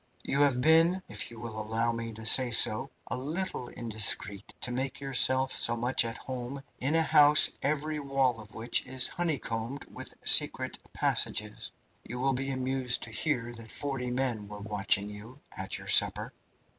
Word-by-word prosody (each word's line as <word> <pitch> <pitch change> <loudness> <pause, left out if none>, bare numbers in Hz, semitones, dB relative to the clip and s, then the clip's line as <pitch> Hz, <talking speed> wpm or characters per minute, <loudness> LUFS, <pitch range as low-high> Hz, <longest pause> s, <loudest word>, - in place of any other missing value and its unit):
"You 140 - -2
have 140 -4 +2
been, 165 +5 +3
if - - -4
you 115 -1 -13
will 110 -2 -7
allow 110 +2 -2
me 115 0 -6
to 110 +1 -10
say 125 +3 +8
so, 115 +2 +3 0.2
a - - -5
little 150 0 -4
indiscreet 105 -3 0
to 125 - -1
make 130 +2 -4
yourself 130 -1 +2
so 120 0 +1
much 120 +2 +1
at 115 0 -6
home 130 +1 -7 0.2
in 140 +5 -1
a 165 - +3
house 150 0 +7
every 150 +2 -2
wall 135 -4 -1
of 105 0 -12
which 115 +2 0
is 130 -1 +4
honeycombed 140 -6 -4
with - - -10
secret - - +3
passages. - - -2 0.3
You 125 - -8
will 135 +1 0
be 135 +2 -4
amused 130 -1 -2
to 115 - -5
hear 120 -1 -3
that 115 -1 -12
forty 135 -3 -4
men 125 -4 -3
were 105 0 -10
watching 105 -1 -1
you 105 +6 -12 0.2
at 95 0 -5
your - - -12
supper. - - +3
125 Hz, 170 wpm, -28 LUFS, 115-135 Hz, 0.3 s, say